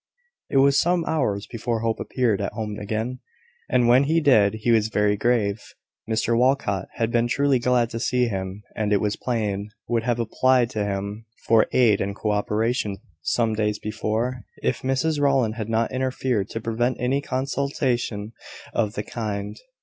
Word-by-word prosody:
It - - +1
was 140 +1 +5
some 175 -1 +1
hours 110 -11 0
before 115 -1 -3
Hope 115 -1 -1
appeared 115 -6 0
at 100 - -3
home 105 -2 -4
again; 110 +5 -3 0.5
and 120 -1 +3
when 125 +3 +5
he 160 +3 +3
did, 110 -9 +4
he 110 +2 0
was 110 -2 +4
very 105 -1 +2
grave. 105 -2 +1 0.5
Mr 110 +1 +1
Walcot 120 -6 +1
had 115 0 -1
been 120 0 +2
truly 140 +1 +2
glad 120 -1 +2
to 115 - -4
see 125 +1 +1
him, 95 -1 -4
and, 105 -1 -1
it 100 - +4
was 105 0 0
plain, 105 -4 -2 0.2
would 115 -1 +1
have 120 0 -1
applied 125 +1 +2
to 110 -4 -1
him 100 +2 -4 0.2
for 115 -1 +4
aid 115 -5 +4
and 100 0 -2
co 105 0 -1
operation 105 0 0 0.2
some 115 +6 +1
days 105 -1 0
before, 110 +4 -2 0.2
if - - 0
Mrs 140 +4 0
Rowland 135 -6 +2
had 110 -1 -5
not 115 +1 +1
interfered, 130 -5 -1
to 115 - -4
prevent 115 +3 -1
any 130 +3 +1
consultation 130 -5 -2 0.4
of 105 -3 0
the 105 - -2
kind. 105 -3 -4
115 Hz, 170 wpm, -24 LUFS, 105-125 Hz, 0.5 s, was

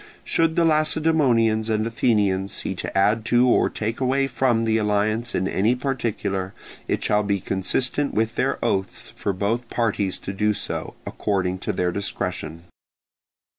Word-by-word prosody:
Should 165 -1 +1
the 170 - +3
Lacedaemonians 150 -8 +2
and 110 0 +1
Athenians 100 -5 +1
see - - -2
to - - -4
add 105 +3 +3
to 120 +2 +4
or 125 - +3
take 110 +2 -3
away 135 +1 +1
from 125 -3 +1
the 110 0 +2
alliance 110 +3 0
in 95 - 0
any 110 +6 +1
particular, 115 -7 -3 0.3
it - - -1
shall 105 0 +2
be 100 -1 0
consistent 130 +10 0
with 110 +1 0
their - - 0
oaths 95 0 -2
for 100 - -2
both 110 +5 -2
parties 105 -5 0
to 95 - -6
do 105 +1 +1
so, - - -4
according 95 -2 -1
to - - -2
their 90 0 0
discretion. 85 -4 -4
110 Hz, 155 wpm, -23 LUFS, 100-125 Hz, 0.3 s, to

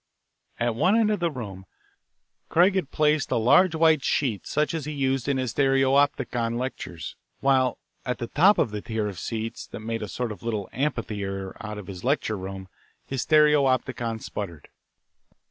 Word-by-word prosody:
At 120 0 +1
one 170 - +3
end 220 -2 +3
of 210 - 0
the 170 -1 +1
room 100 - -7 0.8
Craig 180 +4 +5
had 185 -7 -1
placed 150 -1 +2
a - - +1
large 160 +10 +5
white 160 -3 +4
sheet 120 -9 0
such 150 +2 0
as 160 -4 -3
he 150 - -4
used 135 -3 -1
in 140 -1 +1
his 130 -3 -2
stereopticon 135 -3 +2
lectures, 120 -10 -5 0.2
while 130 -2 +2 0.3
at 125 - -2
the 120 - -3
top 185 - +4
of 110 - +1
the 105 -1 -4
tier 110 -1 -2
of 95 -4 -6
seats 115 0 -4
that - - -8
made 115 +1 -3
a 105 - -4
sort 120 +2 -3
of 105 - -8
little 110 -4 -3
amphitheatre 105 -8 -3
out 105 -1 -5
of 105 - -7
his 90 -1 -8
lecture 125 -4 +1
room 95 0 -7 0.4
his 135 -3 -3
stereopticon 135 -6 +3
sputtered. 85 -8 -7
125 Hz, 175 wpm, -25 LUFS, 110-145 Hz, 0.8 s, Craig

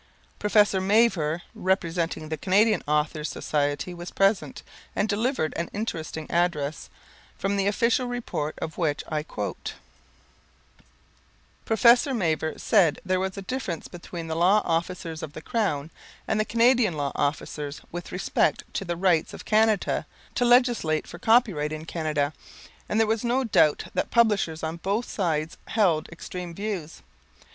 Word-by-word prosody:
Professor 205 -2 +3
Mavor, 190 -6 +2
representing 170 -4 -1
the 160 - -1
Canadian 200 +4 +3
Authors' 150 0 0
Society 145 +3 -1
was 175 0 -7
present, 195 +1 +1 0.3
and 205 - +1
delivered 220 - 0
an 170 - -2
interesting 165 -7 -4
address, 160 -4 0 0.5
from 195 +1 -1
the 200 0 +1
official 235 +4 +2
report 235 -11 -3
of 160 - -6
which 150 -4 0
I 155 -1 -1
quote: 105 -9 -5 1.9
"Professor 240 +4 +5
Mavor 160 -6 0
said 185 -9 +3
there 185 0 +1
was 190 +1 -3
a 195 - -5
difference 190 -8 -4
between 175 -1 -8
the 160 0 -3
law 185 +5 +4
officers 165 -1 -2
of 155 -3 -7
the - - -7
Crown 165 - -1 0.4
and 220 - +1
the 215 - +2
Canadian 230 -6 +3
law 140 -1 -1
officers 145 0 -2
with 175 0 -6
respect 180 0 +1
to - - -2
the 175 -2 -3
rights 175 -3 +2
of - - -11
Canada 215 -1 +2 0.3
to 245 - +1
legislate 240 -10 +3
for 175 - -10
copyright 200 -10 +3
in 155 0 -5
Canada, 155 -3 -1 0.6
and 210 - +1
there 225 - +5
was 220 +1 0
no 245 +3 +1
doubt 160 -10 +3
that - - -1
publishers 205 -9 +2
on 160 +1 -3
both 200 +7 -1
sides 160 -5 -1
held 180 -8 +2
extreme 170 0 -7
views. 195 -6 -5
180 Hz, 145 wpm, -26 LUFS, 155-215 Hz, 1.9 s, Professor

